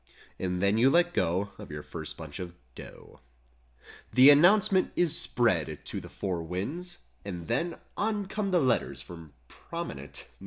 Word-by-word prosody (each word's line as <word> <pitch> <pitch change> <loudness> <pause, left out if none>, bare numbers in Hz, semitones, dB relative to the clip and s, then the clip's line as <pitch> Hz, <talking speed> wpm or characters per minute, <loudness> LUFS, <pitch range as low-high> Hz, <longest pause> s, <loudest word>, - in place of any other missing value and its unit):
And 90 0 -2
then 100 +3 +3
you 130 +3 +6
let 175 +3 +3
go 95 - 0
Of - - -9
your 75 -1 -7
first 80 -2 -6
bunch 80 +1 -8
of 90 -2 -7 0.2
"dough." - - -13 0.9
The 130 +3 +8
'Announcement' 185 +5 +5
is 170 -2 +3
spread 105 - +2
to - - -4
the - - -11
four 90 -3 -3
winds: 140 - -5 0.3
And 90 -4 -6
then 165 +9 -1 0.2
On 210 -1 -1
come 200 +1 -3
the 180 -2 +3
letters 130 -6 0
from 85 -4 -12
prominent 70 +2 -7
115 Hz, 155 wpm, -28 LUFS, -, 0.9 s, The